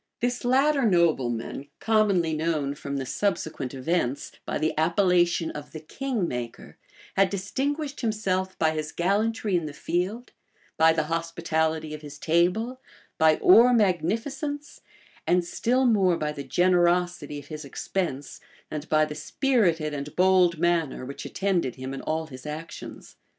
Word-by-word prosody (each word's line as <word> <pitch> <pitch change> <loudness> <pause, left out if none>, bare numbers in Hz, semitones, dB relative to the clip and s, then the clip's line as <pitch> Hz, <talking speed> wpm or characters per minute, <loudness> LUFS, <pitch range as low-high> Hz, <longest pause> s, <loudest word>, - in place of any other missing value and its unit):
This 245 0 -1
latter 275 +4 +3
nobleman 145 - +1
commonly 200 -7 +2
known, 155 -3 -1
from 140 -1 -5
the 135 - -3
subsequent 160 -6 -2
events, 135 -1 -1 0.2
by - - -1
the 155 - 0
appellation 175 0 +2
of 150 0 -9
the 155 - -6
"king 230 - -3
maker," 120 -3 -6 0.4
had 195 0 +4
distinguished 275 - -3
himself 195 -5 -1
by 160 -1 +2
his 155 -1 -4
gallantry 205 +3 0
in 170 -3 0
the 145 - -7
field, 195 +11 -2 0.4
by 160 0 +5
the 160 -1 +1
hospitality 160 -1 -1
of 155 - -7
his 145 -1 -10
table, 180 +11 +1 0.4
by 160 -1 +5
Ore 250 -8 +7
magnificence, 230 - -1 0.5
and 180 0 +3
still 250 +8 +1
more 195 -7 +3
by 150 -1 -2
the 145 -1 -6
generosity, 175 0 +1
of 145 - -11
his 155 -1 -6
expense, 140 0 -4 0.3
and 155 0 -5
by 155 0 +4
the 150 - -6
spirited 170 - +1
and 145 0 -6
bold 180 -2 +4
manner 165 -6 0
which 140 +2 -7
attended 180 -10 -1
him 130 +1 -6
in 135 - -5
all 160 +1 -2
his 130 -2 -10
actions. 155 +2 -8
170 Hz, 145 wpm, -26 LUFS, 155-200 Hz, 0.5 s, Ore